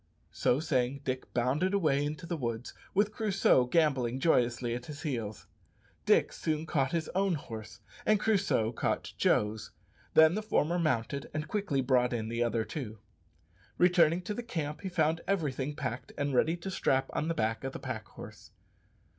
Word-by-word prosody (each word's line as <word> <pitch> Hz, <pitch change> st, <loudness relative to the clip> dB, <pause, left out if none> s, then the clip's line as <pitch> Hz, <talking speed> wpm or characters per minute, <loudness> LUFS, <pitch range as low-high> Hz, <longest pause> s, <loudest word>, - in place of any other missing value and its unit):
So 125 Hz, -, +2 dB
saying 135 Hz, -3 st, 0 dB
Dick 130 Hz, -1 st, -3 dB
bounded 140 Hz, +11 st, +1 dB
away 150 Hz, -7 st, +2 dB
into 155 Hz, +4 st, -4 dB
the 170 Hz, -, -2 dB
woods, 120 Hz, -4 st, -4 dB, 0.2 s
with 205 Hz, +2 st, +3 dB
Crusoe 195 Hz, -, +3 dB
gambolling 130 Hz, -5 st, +2 dB
joyously 120 Hz, -5 st, +2 dB
at 125 Hz, +1 st, -5 dB
his 150 Hz, +1 st, -8 dB
heels. 115 Hz, -9 st, -4 dB, 0.6 s
Dick -, -, +4 dB
soon 155 Hz, -1 st, -2 dB
caught 135 Hz, -4 st, 0 dB
his 165 Hz, -2 st, -1 dB
own 190 Hz, -1 st, +1 dB
horse, 110 Hz, -6 st, -8 dB, 0.2 s
and 215 Hz, -1 st, +3 dB
Crusoe 200 Hz, -, +2 dB
caught 120 Hz, -, -2 dB
Joe's. 105 Hz, 0 st, +1 dB, 0.5 s
Then 160 Hz, +1 st, +7 dB
the 215 Hz, -, -1 dB
former 175 Hz, -5 st, +1 dB
mounted 140 Hz, -3 st, -1 dB
and 155 Hz, 0 st, -2 dB
quickly 185 Hz, -7 st, 0 dB
brought 125 Hz, -1 st, +2 dB
in 110 Hz, -2 st, -2 dB
the 115 Hz, +1 st, -2 dB
other 115 Hz, -1 st, 0 dB
two. 115 Hz, -8 st, -6 dB, 0.8 s
Returning 175 Hz, -1 st, +4 dB
to 210 Hz, -, -3 dB
the 240 Hz, -, -4 dB
camp 155 Hz, -10 st, -4 dB
he 190 Hz, -, -4 dB
found 165 Hz, -2 st, +1 dB
everything 150 Hz, -7 st, -1 dB
packed 130 Hz, -4 st, -5 dB
and 145 Hz, -1 st, -1 dB
ready 160 Hz, +7 st, +2 dB
to 190 Hz, +3 st, -6 dB
strap 135 Hz, -7 st, +1 dB
on 155 Hz, -, -1 dB
the 165 Hz, -, -1 dB
back 110 Hz, +2 st, -1 dB
of 135 Hz, -, -3 dB
the -, -, -6 dB
pack -, -, -5 dB
horse. -, -, -12 dB
145 Hz, 170 wpm, -31 LUFS, 125-170 Hz, 0.8 s, Then